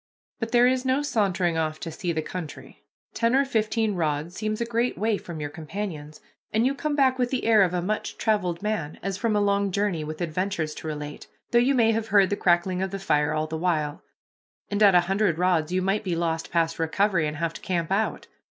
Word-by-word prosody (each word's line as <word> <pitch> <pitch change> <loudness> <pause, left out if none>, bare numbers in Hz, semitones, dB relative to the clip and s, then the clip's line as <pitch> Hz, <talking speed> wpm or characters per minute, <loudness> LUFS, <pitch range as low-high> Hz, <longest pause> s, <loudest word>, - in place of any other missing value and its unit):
But 225 -1 -3
there 240 0 +5
is 255 0 +2
no 265 +2 +1
sauntering 190 - +1
off 155 -1 -2
to 165 - -5
see 175 +2 -3
the 160 -1 -2
country. 175 -3 -8 0.3
Ten 230 +2 +2
or 275 +1 +4
fifteen 220 -3 0
rods 155 -1 -1
seems 215 +2 -3
a 235 - 0
great 235 +1 -1
way 220 +1 +1
from 170 -3 -8
your 145 -1 -4
companions, 155 -2 -6 0.3
and 220 +2 +2
you 270 - +2
come 295 +1 -2
back 260 -2 +3
with 245 -1 +1
the 260 - -2
air 225 -2 +5
of 185 -3 +3
a 175 - -1
much 210 +3 -3
traveled 195 -5 0
man, 190 -8 -2
as 195 -1 -2
from 220 0 0
a - - +3
long 200 0 +2
journey, 200 -5 0
with 155 +1 -6
adventures 175 -1 -2
to 160 - -8
relate, 150 -1 -6 0.2
though 235 - +5
you 265 +3 +3
may 230 -2 +4
have 225 0 -1
heard 200 -2 +4
the - - +2
crackling 180 0 +2
of 190 - -1
the 195 - -4
fire 150 -6 +1
all 155 0 0
the 160 0 -5
while 155 -4 -1 0.7
and 205 +1 -1
at 200 -3 +7
a 175 - +7
hundred 195 -1 +1
rods 175 -3 +1
you 185 0 0
might 195 +3 0
be 180 -4 -1
lost 165 -1 -2
past 165 -1 0
recovery 170 0 +1
and 150 0 -4
have 165 0 -1
to - - -10
camp 170 -2 -2
out. 210 +3 0
190 Hz, 230 wpm, -25 LUFS, 165-215 Hz, 0.7 s, at